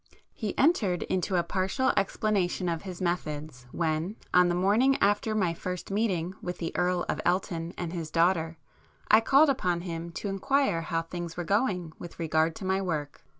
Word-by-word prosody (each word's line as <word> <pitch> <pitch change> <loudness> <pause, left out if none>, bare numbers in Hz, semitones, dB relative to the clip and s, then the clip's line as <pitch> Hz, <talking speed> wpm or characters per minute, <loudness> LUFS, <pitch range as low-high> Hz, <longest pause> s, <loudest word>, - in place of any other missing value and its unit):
He 215 -4 -4
entered 220 - +2
into 185 +1 -1
a 175 - +3
partial 190 +9 0
explanation 195 -3 0
of 165 -2 -1
his 185 -2 -6
methods, 150 -6 -3
when, 165 +4 -1 0.2
on 180 0 +6
the 175 - +1
morning 215 +9 +3
after 205 +2 +2
my 185 -5 +1
first 180 +2 -5
meeting 190 -5 0
with 180 0 -4
the 165 - -4
Earl 180 0 +1
of - - -2
Elton 175 -2 -1
and 175 -1 -4
his 165 -3 -4
daughter, 165 -1 +1 0.5
I 215 +1 +8
called 275 +5 +5
upon 180 -10 -1
him 170 -1 -5
to 205 - -4
inquire 195 0 +1
how 165 0 -2
things 170 0 -6
were 175 - -2
going 185 -4 0
with 175 - -9
regard 160 -1 +1
to 190 - -7
my 190 +1 +1
book. 155 -6 -3
180 Hz, 180 wpm, -28 LUFS, 165-195 Hz, 0.5 s, I